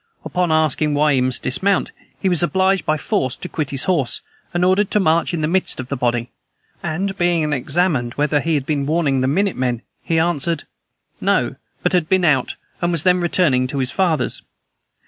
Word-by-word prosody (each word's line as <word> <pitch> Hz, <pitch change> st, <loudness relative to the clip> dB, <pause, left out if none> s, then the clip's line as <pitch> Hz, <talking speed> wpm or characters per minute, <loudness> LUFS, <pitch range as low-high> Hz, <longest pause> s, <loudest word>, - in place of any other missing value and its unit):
Upon 180 Hz, -2 st, 0 dB
asking 155 Hz, -1 st, +2 dB
why 150 Hz, 0 st, +3 dB
he 130 Hz, -, +2 dB
must 130 Hz, 0 st, 0 dB
dismount, 195 Hz, +9 st, +1 dB, 0.3 s
he -, -, -1 dB
was 175 Hz, -3 st, +4 dB
obliged 190 Hz, +2 st, +1 dB
by 155 Hz, -, +2 dB
force 130 Hz, -3 st, -1 dB
to -, -, -7 dB
quit 155 Hz, -5 st, -3 dB
his 140 Hz, +2 st, -1 dB
horse, 160 Hz, -9 st, 0 dB, 0.3 s
and 175 Hz, +1 st, +1 dB
ordered 190 Hz, +2 st, +2 dB
to 210 Hz, -, +2 dB
march 165 Hz, -3 st, +2 dB
in 170 Hz, -3 st, -2 dB
the 155 Hz, -, +1 dB
midst 185 Hz, -2 st, 0 dB
of 130 Hz, 0 st, -6 dB
the 140 Hz, -, -2 dB
body; 120 Hz, -1 st, -1 dB, 0.5 s
and, 190 Hz, +5 st, -2 dB
being 170 Hz, -4 st, +1 dB
examined 140 Hz, -2 st, 0 dB
whether 145 Hz, 0 st, +1 dB
he 165 Hz, +2 st, 0 dB
had 140 Hz, -3 st, -1 dB
been 140 Hz, -2 st, -1 dB
warning 150 Hz, -4 st, +1 dB
the 130 Hz, -, +1 dB
minute 195 Hz, +7 st, 0 dB
men, 125 Hz, -2 st, -1 dB, 0.2 s
he 165 Hz, -, -1 dB
answered, 165 Hz, -1 st, 0 dB, 0.6 s
'No, -, -, +1 dB, 0.3 s
but -, -, +1 dB
had 175 Hz, -3 st, +1 dB
been 185 Hz, -2 st, +3 dB
out, 140 Hz, -6 st, +2 dB, 0.3 s
and 175 Hz, 0 st, +1 dB
was 165 Hz, -4 st, 0 dB
then 180 Hz, -1 st, +3 dB
returning 155 Hz, -7 st, +2 dB
to 140 Hz, -, -5 dB
his 130 Hz, -1 st, -1 dB
father's.' 170 Hz, -8 st, +1 dB
155 Hz, 200 wpm, -20 LUFS, 135-180 Hz, 0.6 s, was